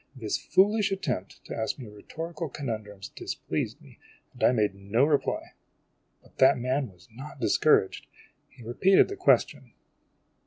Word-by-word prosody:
This 110 -5 -3
foolish 205 +1 +2
attempt 125 - -4
to - - -6
ask 110 - -2
me 125 -5 -9
rhetorical 160 +10 -7
conundrums 110 -8 -6
displeased - - -4
me, - - -18 0.3
and - - -7
I - - +6
made 105 -5 +1
no 100 +7 +1
reply. 145 -2 -1 0.7
But - - -24
that 135 0 +6
man 130 0 -1
was 90 0 -21
not 135 +5 -10
discouraged. 120 -4 +2 0.4
He 125 - -16
repeated 185 - +4
the 400 - -5
question. 375 - +1
130 Hz, 145 wpm, -27 LUFS, 105-155 Hz, 0.7 s, I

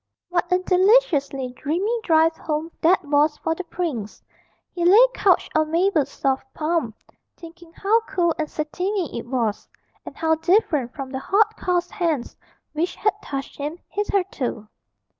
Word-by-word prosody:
What 350 0 -1
a 360 - +5
deliciously 365 - +2
dreamy 360 - -1
drive 320 0 +3
home 310 +1 -3
that 360 +1 +3
was 295 +1 +2
for 325 - -1
the 370 - -6
prince; 285 - -4 0.5
he 345 - -3
lay 405 +8 +8
couched 375 -3 +2
on 310 0 +2
Mabel's 335 -2 +2
soft 265 -1 -2
palm, 310 -8 -1 0.4
thinking 335 0 -13
how 415 +6 +2
cool 345 -3 +1
and 305 -1 -2
satiny 360 +3 -3
it 235 - -9
was, 235 -5 -2 0.4
and - - -10
how 320 0 +2
different 320 - +1
from 270 -2 -6
the 265 - -3
hot 425 +8 +2
coarse 355 -1 -1
hands 320 -8 -2 0.4
which 325 +4 -2
had 420 -1 +1
touched 275 -5 -6
him 295 +4 -4
hitherto. 365 - -2
330 Hz, 150 wpm, -23 LUFS, 285-365 Hz, 0.5 s, lay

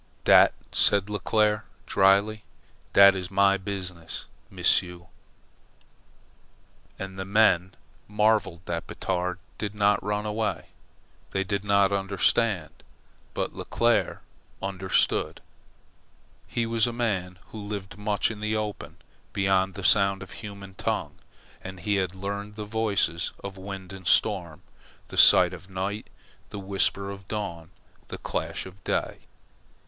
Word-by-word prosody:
"Dat," - - +6 0.2
said 100 0 +3
Leclere, 105 0 +1 0.2
dryly, 100 +2 +3 0.5
"dat 100 0 +8
is 90 -2 -5
my 100 +1 +4
biz'ness, 95 -4 -6 0.2
M'sieu'." 90 0 +1 1.9
And 95 0 -7
the - - -2
men 95 -3 +3 0.3
marvelled 105 -4 +1
that 85 - -4
Batard 90 -1 -2 0.2
did 105 -1 -4
not 105 -1 +2
run 105 +1 -2
away. 105 +1 -2 0.6
They 95 - -1
did 100 +1 -2
not 100 -1 +3
understand. 100 -2 0 0.5
But - - -2
Leclere - - 0 0.4
understood. 95 -2 0 1.1
He 120 - -1
was 115 0 +2
a - - -2
man 100 -7 -2
who 110 - -7
lived 100 -1 -6
much 105 +1 0
in 105 - -8
the 110 +1 -1
open, 105 -1 -4 0.4
beyond 95 -1 +1
the 100 - -7
sound 100 0 +3
of 95 - -13
human 100 -3 -9
tongue, - - -3 0.4
and 95 0 -8
he 100 +2 +1
had 95 -1 -1
learned 100 +2 -5
the 105 -1 -5
voices 105 -6 0
of 100 -1 -6
wind 95 -1 -8
and 95 -2 -9
storm, 90 -7 +2 0.5
the - - -8
sigh - - +9
of 95 - -9
night, 95 +3 -4 0.4
the 105 - -7
whisper 100 0 0
of 100 -1 -10
dawn, 90 -6 -5 0.4
the - - -6
clash - - -4
of 95 0 -13
day. - - -2
100 Hz, 130 wpm, -26 LUFS, 95-105 Hz, 1.9 s, sigh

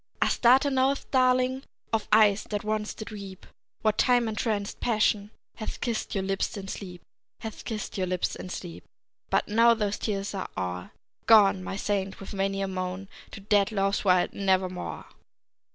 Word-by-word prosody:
Astarte 265 +3 +4
knoweth, 265 +1 +1
darling, 255 0 +3 0.3
Of 220 -2 0
eyes 210 -1 +5
that 205 -1 -3
once 215 0 -2
did 220 - -8
weep, 195 -3 -9 0.4
What 215 -1 +2
time 245 -2 +4
entranced 210 -2 -2
Passion 210 -3 +1 0.3
Hath 215 - -5
kissed 230 -3 -2
your 195 - 0
lips 195 +3 -1
in 195 -1 -7
sleep; 180 -4 -7 0.4
Hath 220 -2 -7
kissed 215 -3 -5
your 185 - 0
lips 180 0 -1
in 185 - -8
sleep; 175 -2 -7 0.5
But - - +1
now 230 +2 +5
those 210 -2 -2
tears 200 -2 -2
are 195 - -4
o'er, 90 -1 -3 0.4
Gone, 200 -4 +6
my 190 - -4
saint, 195 -1 -2
with 195 - -8
many 195 0 -1
a - - -1
moan 185 +1 -4 0.2
to - - -10
Dead 205 +1 +2
Love's 195 -1 0
wild 180 -3 +3
Nevermore! 185 -2 -1
205 Hz, 165 wpm, -27 LUFS, 195-220 Hz, 0.5 s, Gone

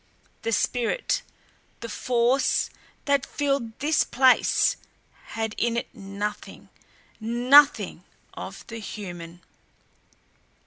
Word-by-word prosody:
The 230 - -2
spirit, 245 - 0 0.6
the 230 - -5
force, 245 +3 +1 0.3
that 280 -1 +2
filled 275 -6 -2
this 300 +3 +2
place 260 0 +3 0.5
had 220 -1 -4
in 235 0 +1
it 235 - -4
nothing, 205 -1 -6 0.5
NOTHING 250 +6 +4 0.3
of - - -8
the 230 0 -8
human. 175 -5 -8
235 Hz, 90 wpm, -25 LUFS, 215-265 Hz, 0.6 s, NOTHING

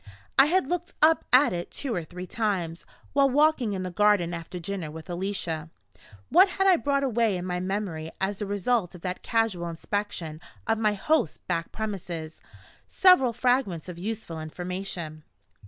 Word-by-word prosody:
I 270 - +7
had 365 -1 +2
looked 350 +2 -3
up 320 +1 +5
at 255 -4 +6
it 175 0 -4
two 270 -5 -3
or 175 - -2
three 180 +3 -8
times, 185 -6 -2 0.3
while 275 -1 +4
walking 280 -5 +3
in 185 -1 -3
the 185 - -4
garden 195 -2 +3
after 170 +1 -6
dinner 175 -2 -4
with 160 +3 -9
Alicia. 175 -4 -3 0.6
What 370 +5 +6
had 385 +2 0
I 380 -2 +7
brought 280 -2 0
away 230 -6 +1
in 180 - -5
my 180 -1 -2
memory 185 -4 -3
as 195 +1 -1
the 205 - -3
result 205 -1 0
of 175 - -12
that 180 0 -4
casual 215 -7 0
inspection 170 -2 -4 0.2
of 225 0 +1
my 215 -2 +2
host's 305 - +1
back 165 0 -3
premises? 175 -7 -5 0.5
Several 365 -10 +5
fragments 245 -8 0
of 175 -2 -7
useful 200 -4 -4
information. 170 -1 -5
195 Hz, 170 wpm, -27 LUFS, 175-240 Hz, 0.6 s, I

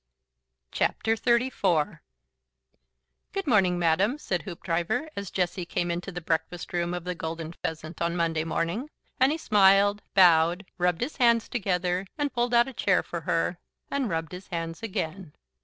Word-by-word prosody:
XXXIV. 225 - +1 1.3
"Good 390 0 -2
morning, 195 - +3
Madam," 175 - +2
said 180 - -2
Hoopdriver, 175 - -2
as 200 -2 -5
Jessie 180 0 -1
came 175 0 -2
into 175 +3 -4
the 175 - -5
breakfast 170 +2 -2
room 175 0 0
of 175 - -5
the 180 +1 -3
Golden 165 -1 -5
Pheasant 160 0 -6
on 170 0 0
Monday 165 -2 0
morning, 170 - -2 0.3
and 260 +2 +5
he 315 - -1
smiled, 205 -4 +4
bowed, 175 0 +5
rubbed 180 -1 +1
his 255 +6 -3
hands 235 -2 +4
together, 185 -4 -1
and 290 -1 -1
pulled 240 0 +1
out 235 +1 +5
a 270 - -7
chair 195 -5 +2
for 170 - -5
her, 165 +2 0 0.3
and 275 -5 0
rubbed 165 -2 -2
his 180 +1 -9
hands 165 -2 -4
again. 185 -6 -4
180 Hz, 155 wpm, -27 LUFS, 170-220 Hz, 1.3 s, and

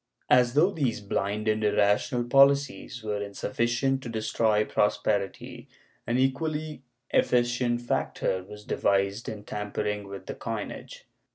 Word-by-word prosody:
As 125 0 +5
though 170 +7 +5
these 135 - -1
blind 100 +1 -2
and 110 0 +1
irrational 105 +4 +2
policies 135 -1 +3
were 105 -1 -2
insufficient 120 +6 -1
to 125 - -7
destroy 110 -1 +1
prosperity, 105 -1 -1 0.4
an 120 - +1
equally 150 +3 -1 0.3
efficient 120 0 +2
factor 95 -5 -1
was 105 +2 -12
devised 100 +2 0
in 105 -2 -7
tampering 105 0 -3
with 100 0 -8
the - - -5
coinage. - - -6
110 Hz, 120 wpm, -27 LUFS, 105-125 Hz, 0.4 s, As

